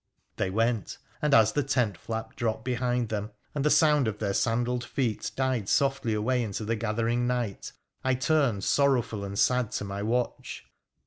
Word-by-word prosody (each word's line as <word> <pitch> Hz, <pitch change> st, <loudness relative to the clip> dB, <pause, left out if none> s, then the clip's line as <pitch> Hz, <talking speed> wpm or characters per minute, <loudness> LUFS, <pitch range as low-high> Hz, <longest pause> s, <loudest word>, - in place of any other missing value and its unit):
' -, -, -46 dB
They -, -, 0 dB
went, 115 Hz, +1 st, 0 dB, 0.2 s
and 150 Hz, -, +1 dB
as 110 Hz, -4 st, +6 dB
the 145 Hz, -, +1 dB
tent 125 Hz, -7 st, 0 dB
flap 110 Hz, +6 st, -6 dB
dropped 110 Hz, -2 st, -2 dB
behind 125 Hz, -2 st, 0 dB
them 105 Hz, -1 st, -3 dB, 0.2 s
and 145 Hz, -, -1 dB
the 150 Hz, -, +3 dB
sound 150 Hz, -5 st, +4 dB
of 105 Hz, -1 st, -2 dB
their 100 Hz, -2 st, -1 dB
sandalled 120 Hz, +3 st, 0 dB
feet 120 Hz, -6 st, -2 dB
died 130 Hz, -6 st, 0 dB
softly 135 Hz, -4 st, +1 dB
away 125 Hz, +4 st, +1 dB
into 110 Hz, -1 st, -3 dB
the 115 Hz, +2 st, 0 dB
gathering 115 Hz, +2 st, 0 dB
night, 120 Hz, -5 st, -2 dB, 0.3 s
I 130 Hz, -1 st, +2 dB
turned 130 Hz, -, +1 dB
sorrowful 125 Hz, -7 st, +2 dB
and 100 Hz, 0 st, -5 dB
sad 125 Hz, -1 st, +2 dB
to -, -, -2 dB
my 100 Hz, 0 st, -5 dB
watch. 120 Hz, +4 st, -2 dB
120 Hz, 180 wpm, -28 LUFS, 110-130 Hz, 0.3 s, as